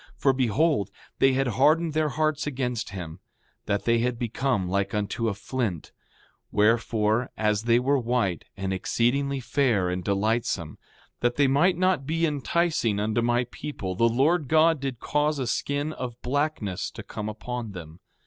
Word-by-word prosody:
For 135 - +3
behold, 130 - +1 0.3
they 135 0 +5
had 135 +1 +1 0.2
hardened 160 +1 +4
their 155 -1 +1
hearts 155 0 0
against 125 -4 -2
him, 85 -3 -7 0.5
that 100 -2 -1
they 115 0 +3
had 120 0 0
become 120 -3 -1
like 100 +3 -1
unto 105 +3 -1
a 100 - -3
flint; 100 - -3 0.6
wherefore, 110 +1 +2
as 105 0 0
they 120 0 +4
were 135 +3 +2
white, 115 -7 -1
and 95 0 -2
exceedingly 135 +8 0
fair 115 -8 +1
and 90 0 -3
delightsome, 100 -5 -1 0.4
that 120 0 +1
they 145 - +4
might 150 +7 +3
not 185 -7 +1
be 165 +2 +1
enticing 150 -7 0
unto 110 +2 0
my 120 +1 +2
people 100 -11 -5
the 115 +5 +3
Lord 145 +6 +2
God 160 +2 +4
did 135 -3 -4
cause 150 0 0
a 130 - -2
skin 145 +5 -1
of 125 -4 -6
blackness 140 -8 -1
to - - -9
come 105 0 -5
upon 115 0 -5
them. 85 -2 -10
120 Hz, 160 wpm, -26 LUFS, 105-145 Hz, 0.6 s, they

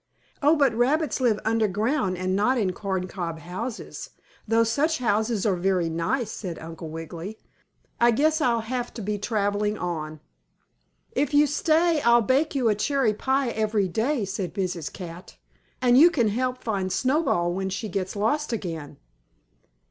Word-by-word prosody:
"Oh, 295 +3 +5
but 280 -6 +3
rabbits 265 +4 +1
live 225 -4 +2
underground, 220 0 +1
and 185 +1 -1
not 250 +6 +2
in 195 -5 0
corncob 185 -3 -3
houses, 200 +9 -6 0.4
though 225 +1 +4
such 290 +8 +1
houses 220 -2 0
are 200 -3 +2
very 180 -1 +1
nice," 185 +9 -1
said 180 -5 -6
Uncle 165 0 -8
Wiggily. 165 +6 -7 0.6
"I 235 - +5
guess 310 +7 +2
I'll 235 -4 +2
have 245 +2 -3
to 230 - -5
be 210 +1 -2
traveling 210 -1 0
on." 155 -4 -4 0.9
"If 290 +2 0
you 295 +1 +6
stay, 315 +2 +2
I'll 235 -1 +5
bake 275 +7 +1
you 255 -4 +2
a 215 - +4
cherry 240 +1 +1
pie 265 +4 0
every 215 -3 0
day," 225 - 0
said 195 -2 -4
Mrs. 180 -5 -2
Cat. 175 -1 -9 0.5
"And 245 0 +6
you 335 +4 +9
can 240 -10 +1
help 250 +3 -2
find 195 -4 -1
Snowball 255 - +1
when 190 +1 -2
she 195 +4 -4
gets 190 0 -3
lost 245 +9 0
again." 165 -9 -5
215 Hz, 155 wpm, -25 LUFS, 185-255 Hz, 0.9 s, you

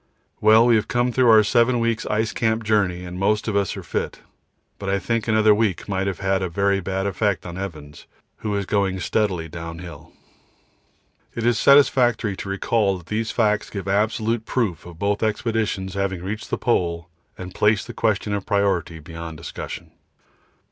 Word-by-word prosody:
Well, 110 +2 +6
we 120 -2 +5
have 105 - -1
come 120 0 +1
through 125 0 +3
our 110 -1 +7
7 120 +3 +3
weeks' 115 -1 -1
ice 110 +1 0
camp 115 -1 0
journey 95 -5 +1
and 90 0 -7
most 105 +3 +1
of 105 - -1
us 100 -2 0
are - - -7
fit, - - -3 0.6
but 100 - -4
I 100 - +2
think 115 +2 -2
another 110 -1 +5
week 105 -5 0
might 95 -1 -1
have 95 -2 -3
had 95 -1 +1
a 95 - -2
very 100 +3 +1
bad 95 +1 -3
effect 100 0 -1
on 85 -1 -6
Evans, 80 -6 -8 0.3
who 105 -1 -3
is 100 -1 -1
going 95 -1 0
steadily 90 -3 -1
downhill. 85 -1 -9 1.2
It 115 - -2
is 120 -2 +2
satisfactory 120 -7 +4
to 100 - -6
recall 100 0 +1
that 85 -2 -15
these 110 +1 -1
facts 105 -2 +1
give 100 -2 -6
absolute 110 +3 0
proof 100 -11 -1
of 85 -2 -11
both 100 +2 -1
expeditions 110 -4 -1
having 95 -2 -2
reached 105 +3 -5
the - - -1
Pole 85 -1 0 0.3
and 90 0 -8
placed 105 -1 +2
the - - -8
question 105 -2 0
of 100 -1 -2
priority 95 -5 0
beyond 80 +1 -8
discussion. 80 - -7
100 Hz, 180 wpm, -22 LUFS, 90-110 Hz, 1.2 s, our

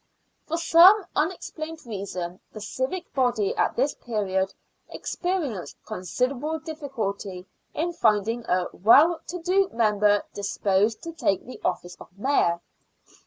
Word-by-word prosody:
For 330 - -1
some 345 +5 +7
unexplained 320 -1 -3
reason, 190 -4 -5
the 215 - -7
civic 260 - -4
body 245 -6 +1
at - - +1
this 275 +4 +1
period 195 -4 -1 0.4
experienced 330 - -3
considerable 250 - -2
difficulty 230 - -5 0.3
in 345 +3 -1
finding 225 - +1
a 180 0 +2
well 300 - +5
to 360 - -4
do 375 +3 +2
member 210 -2 +3
disposed 200 +1 0
to 335 - -5
take 200 - 0
the 255 - -10
office 180 -1 -2
of - - -11
Mayor. 200 -8 +1
240 Hz, 120 wpm, -25 LUFS, 200-320 Hz, 0.4 s, some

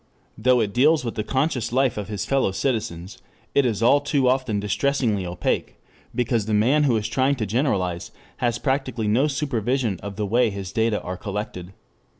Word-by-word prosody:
Though 125 +2 +3
it 100 -2 -1
deals 150 +2 +3
with 115 - -2
the 105 - -3
conscious 130 -2 -1
life 130 -1 +2
of 105 -2 -4
his 105 -2 -4
fellow 135 -7 +1
citizens, 105 -3 -3 0.3
it 140 -2 +3
is 115 -1 -1
all 140 +5 +5
too 140 -2 +1
often 125 -5 +1
distressingly 105 -1 0
opaque, 85 - -2 0.4
because 115 -3 0
the 110 - +1
man 135 +8 +3
who 120 -5 +3
is 105 - -2
trying 135 +1 +1
to 115 -5 -2
generalize 100 - -1 0.3
has 120 -1 0
practically 130 -5 -1
no 120 +8 +3
supervision 125 - -1
of 100 -1 -6
the 105 +1 -2
way 120 +3 +2
his 100 -2 -6
data 110 -1 +1
are 90 0 -5
collected. 100 -3 -5
115 Hz, 180 wpm, -23 LUFS, 105-130 Hz, 0.4 s, all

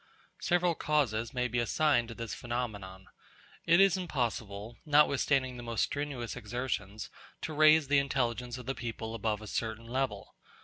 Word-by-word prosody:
Several 175 -1 +2
causes 120 -9 0
may 125 -1 0
be 120 0 -1
assigned 120 0 +2
to 115 - -8
this 115 -1 -5
phenomenon. 105 -6 -5 0.6
It 170 +1 +6
is 195 -1 +5
impossible, 115 - -3
notwithstanding 140 -3 +3
the - - -7
most 115 -2 -1
strenuous 145 -5 -3
exertions, 110 -3 -4 0.3
to 160 - -4
raise 155 0 +6
the 140 0 +4
intelligence 125 -3 -1
of 125 - -9
the 135 - -1
people 115 -3 -5
above 110 -1 -2
a - - -8
certain 115 +1 -3
level. 130 +3 -3
125 Hz, 150 wpm, -31 LUFS, 115-145 Hz, 0.6 s, It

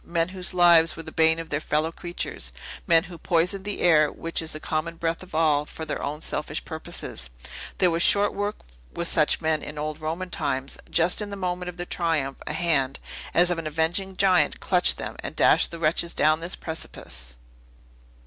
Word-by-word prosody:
"Men 170 0 -1
whose 185 0 -3
lives 170 -2 +6
were 165 - -8
the 155 - -9
bane 160 0 +3
of 165 -1 -6
their 145 +1 -1
fellow 155 +1 0
creatures. 165 - -5 0.4
Men 165 -1 +5
who 175 -2 -10
poisoned 180 +3 0
the 205 - -2
air, 155 -4 +5
which 165 0 -4
is 160 - -3
the 155 - -6
common 160 +2 -3
breath 165 0 -2
of 185 -4 -10
all, 155 -2 +3
for 160 +1 -7
their 150 - -4
own 150 +2 -4
selfish - - -3
purposes. - - -3 0.5
There 180 -2 +3
was 165 +1 0
short 205 +2 +5
work 205 +1 -2 0.4
with 170 - -2
such 155 -1 +3
men 160 -1 +1
in 150 - -8
old 155 +1 -4
Roman 170 +4 -4
times. 135 0 -2
Just 170 +5 +2
in 210 - -4
the 200 - -5
moment 180 -1 -3
of 180 - -9
their 175 - -4
triumph, 160 -7 -1
a - - -2
hand, 150 -5 +1 0.4
as 175 +1 +5
of 170 - -1
an 160 - -4
avenging 170 +5 -1
giant, 185 -6 +3
clutched - - +3
them, - - -6
and - - -6
dashed - - +4
the 170 - -7
wretches 165 +1 0
down 155 +1 +3
this 170 +2 -3
precipice." 65 - -6
165 Hz, 200 wpm, -25 LUFS, 155-180 Hz, 0.5 s, lives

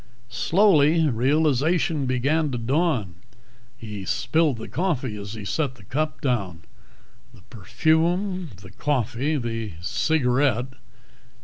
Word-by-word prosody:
Slowly, 160 - +3
realization 145 +4 +1
began 140 +5 +1
to 125 - -3
dawn. 120 - 0 0.6
He 105 -3 -7
spilled 135 - +1
the 110 - -7
coffee 145 - -2
as 100 0 -7
he 105 -2 -8
set 135 +3 -1
the 105 - -17
cup 155 +10 -3
down. 100 - -2 0.7
The - - -18
perfume. 170 - 0
The 95 - -12
coffee. 135 +3 -1
The 115 -5 -4
cigarette.... 130 - +1
135 Hz, 110 wpm, -24 LUFS, 115-160 Hz, 0.7 s, Slowly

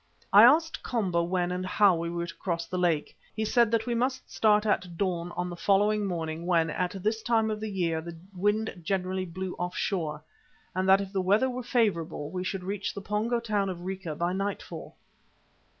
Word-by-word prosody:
I - - +10
asked 320 +1 +5
Komba 190 -8 0
when 175 0 0
and 180 +1 -2
how 190 0 +4
we 170 0 -3
were 170 0 -3
to 170 - -8
cross 170 -2 -2
the 185 +1 -3
lake. 170 -4 0 0.2
He 220 - -1
said 235 0 +3
that 230 0 +1
we 240 - -1
must 255 +2 -2
start 210 -1 +3
at 180 -5 0
dawn 175 -2 -1
on 180 - -1
the 175 - -6
following 205 +3 +2
morning 165 -1 -3
when, 165 -3 +2
at 180 +2 -3
this 220 +1 0
time 225 -1 +2
of 215 - -3
the 215 0 -4
year, 170 -5 -1
the 170 0 -8 0.2
wind 205 +1 0
generally 185 +1 -1
blew 185 +2 -5
off 180 +1 -3
shore, 155 -6 -2 0.5
and 185 +1 0
that 195 +1 +6
if 195 0 -7
the 190 - +1
weather 210 +8 +3
were 250 +1 -4
favourable, 170 - 0
we 185 0 -3
should 185 0 -3
reach 200 +2 -3
the 200 - -5
Pongo 215 +4 0
town 210 -4 0
of 175 -2 -5
Rica 185 -4 -4
by 175 +3 -1
nightfall. 195 +1 -4
190 Hz, 205 wpm, -28 LUFS, 175-210 Hz, 0.5 s, I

